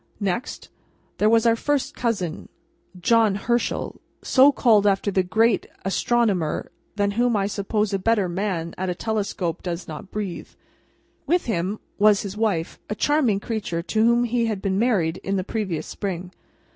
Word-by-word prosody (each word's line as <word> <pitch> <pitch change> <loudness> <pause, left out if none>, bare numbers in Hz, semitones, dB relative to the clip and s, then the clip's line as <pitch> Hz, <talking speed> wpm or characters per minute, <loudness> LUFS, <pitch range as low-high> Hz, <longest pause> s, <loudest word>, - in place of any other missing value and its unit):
Next, 200 +3 -3 0.5
there 210 - +4
was 230 0 +4
our 230 -1 +5
first 285 +3 -1
cousin 200 -9 -2 0.5
John 220 +2 +3
Herschel, 240 +3 -1 0.2
so 270 +2 +6
called 215 -7 +4
after 200 +1 +1
the 190 - +2
great 220 +4 +2 0.2
astronomer: 195 -5 0 0.2
than 200 -1 +1
whom 240 +2 +1
I 200 -1 +1
suppose 210 +1 -1
a 195 - +1
better 210 -1 +2
man 175 -2 -2
at 185 0 -1
a 180 - -2
telescope 200 -5 -2
does 175 0 -5
not 155 +4 -8
breathe. 200 -4 -5 0.8
With 350 +4 +2
him, 195 -1 -1 0.2
was 210 -1 +5
his 200 -1 -6
wife: 205 -7 -1
a 210 - -2
charming 265 -7 +2
creature 200 -7 -3
to 215 +4 +1
whom 235 +1 +4
he 235 -1 0
had 215 -3 -2
been 190 0 -1
married 190 -9 +1
in 195 - -3
the 190 - 0
previous 190 -6 -3
spring. 180 -2 -5
205 Hz, 160 wpm, -23 LUFS, 185-230 Hz, 0.8 s, so